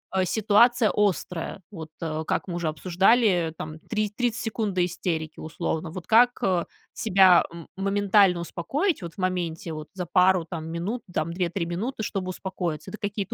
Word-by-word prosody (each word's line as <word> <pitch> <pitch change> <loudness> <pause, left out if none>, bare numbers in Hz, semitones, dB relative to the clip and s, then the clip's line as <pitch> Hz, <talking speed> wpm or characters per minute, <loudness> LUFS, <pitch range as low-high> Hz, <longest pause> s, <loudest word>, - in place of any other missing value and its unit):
э, 185 -1 +2
ситуация 220 +3 +4
острая? 195 -2 -1
Вот, 160 -4 -8
э, 160 -1 -2
как - - -1
мы 175 - -4
уже 170 -2 -2
обсуждали, 180 +2 +2
там 155 0 -7
три 215 +3 -2
тридцать 240 -2 -1
секунд 215 -2 -2
до 180 -1 +3
истерики 165 -3 -3
условно. 160 +1 -3
Вот 175 +1 -8
как, 245 +2 +6
э, 180 -3 +1 0.3
себя, 190 -4 +5
м, 170 -1 -10
моментально 200 -1 +3
успокоить 275 - -1
вот 170 -1 -7
в - - -40
моменте, 175 -3 -2
вот 155 0 -7
за 180 -2 -3
пару 180 -1 +3
там 160 -2 -6
минут, 200 +8 -3
там 165 0 -2
2-3 175 0 -1
минуты, 220 +8 -3
чтобы 190 -3 -3
успокоиться? 180 -4 -4
Это 215 - -8
какие-то 205 -1 -3
185 Hz, 170 wpm, -25 LUFS, 170-205 Hz, 0.3 s, как